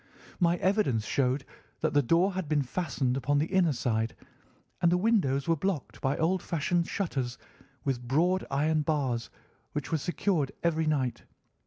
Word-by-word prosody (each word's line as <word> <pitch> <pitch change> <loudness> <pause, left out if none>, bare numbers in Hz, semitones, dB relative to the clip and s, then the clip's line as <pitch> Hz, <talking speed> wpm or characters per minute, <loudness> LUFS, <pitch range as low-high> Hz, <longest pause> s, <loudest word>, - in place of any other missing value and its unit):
My 175 -1 +3
evidence 185 - +1
showed 130 +2 0 0.4
that - - +1
the 145 - +5
door 170 +9 +3
had 185 -5 -3
been 150 -2 +2
fastened 135 -3 -1
upon 145 +2 +1
the 145 - +2
inner 180 -2 +2
side, 115 -3 -1 0.7
and 170 - +4
the 180 - +4
windows 180 - +2
were 165 - +4
blocked 165 -2 -3
by 135 +2 0
old 180 +3 +1
fashioned 170 +1 0
shutters 135 -10 -2 0.5
with 130 -3 -1
broad 175 +8 +2
iron 155 +3 +2
bars, 140 -6 -1 0.4
which 145 -2 -4
were 160 - +1
secured 175 -2 0
every 160 -2 +1
night. 135 -5 0
155 Hz, 160 wpm, -29 LUFS, 135-175 Hz, 0.7 s, the